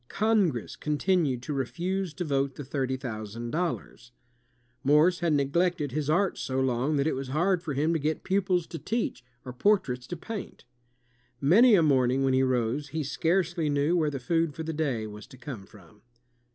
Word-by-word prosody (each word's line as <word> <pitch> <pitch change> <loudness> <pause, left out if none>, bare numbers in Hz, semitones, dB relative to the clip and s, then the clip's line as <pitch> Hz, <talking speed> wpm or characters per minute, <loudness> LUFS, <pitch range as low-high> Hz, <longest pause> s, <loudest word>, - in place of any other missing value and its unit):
Congress 200 - +1
continued 150 -4 0
to 150 - -4
refuse 175 +7 -2
to 175 +3 -5
vote 140 -2 0
the 145 - -6
thirty 130 -1 -2
thousand 115 -2 -6
dollars. 160 -7 -3 0.7
Morse 150 +6 +4
had 170 -2 +1
neglected 150 +2 +1
his 150 +2 -2
art 185 +4 +1
so 130 0 -2
long 130 +3 +1
that 140 -1 +1
it 160 - +1
was 135 0 -4
hard 170 +6 +1
for 155 -5 -4
him 155 +4 +1
to 165 - 0
get 155 +2 -2
pupils 185 -3 +1
to 165 - -7
teach, 220 - -2 0.2
or 125 - -6
portraits 125 -7 +1
to 175 - -5
paint. 205 - -7 0.7
Many 210 - +6
a 170 - +4
morning 130 -2 +3
when 135 -1 +2
he 130 - +3
rose, 130 +2 0
he 155 +2 -3
scarcely 170 +2 0
knew 145 +4 +2
where 160 -3 +2
the 140 -2 -4
food 165 +3 0
for 160 - -5
the 160 0 -3
day 140 -8 -1
was 105 +1 -9
to 130 -1 -14
come 120 -6 -8
from. 100 -1 -18
150 Hz, 185 wpm, -28 LUFS, 130-175 Hz, 0.7 s, Many